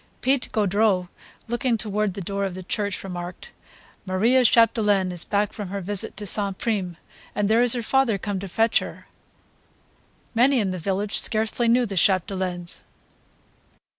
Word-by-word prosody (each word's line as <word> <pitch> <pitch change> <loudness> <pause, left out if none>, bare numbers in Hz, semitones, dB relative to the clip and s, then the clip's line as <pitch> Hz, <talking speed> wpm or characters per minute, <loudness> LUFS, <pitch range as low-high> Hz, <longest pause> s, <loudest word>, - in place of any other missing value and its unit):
Pite 265 0 +1
Gaudreau, 200 -3 +1 0.4
looking 240 0 0
toward 210 -3 -2
the 200 - -5
door 200 +2 -3
of 190 -2 -3
the 185 - -7
church, 205 +2 -3
remarked: 180 -2 -7 0.5
"Maria 220 +7 +2
Chapdelaine 210 -5 +3
is 175 -1 -2
back 205 0 -1
from 205 -3 -6
her 200 +2 -4
visit 195 +1 0
to 210 - -5
St. 200 -1 +1
Prime, 195 -6 -2 0.4
and 205 -1 +1
there 225 +3 +3
is 245 -1 +4
her 240 -2 -2
father 260 -3 +2
come 200 0 -4
to 195 - -6
fetch 225 +6 +2
her." - - -9 1.3
Many 250 +3 +4
in 200 -4 0
the 185 - -4
village 200 +4 -1
scarcely 220 +2 +1
knew 245 +2 +3
the 200 -4 -5
Chapdelaines. 185 -1 0
205 Hz, 160 wpm, -24 LUFS, 185-225 Hz, 1.3 s, is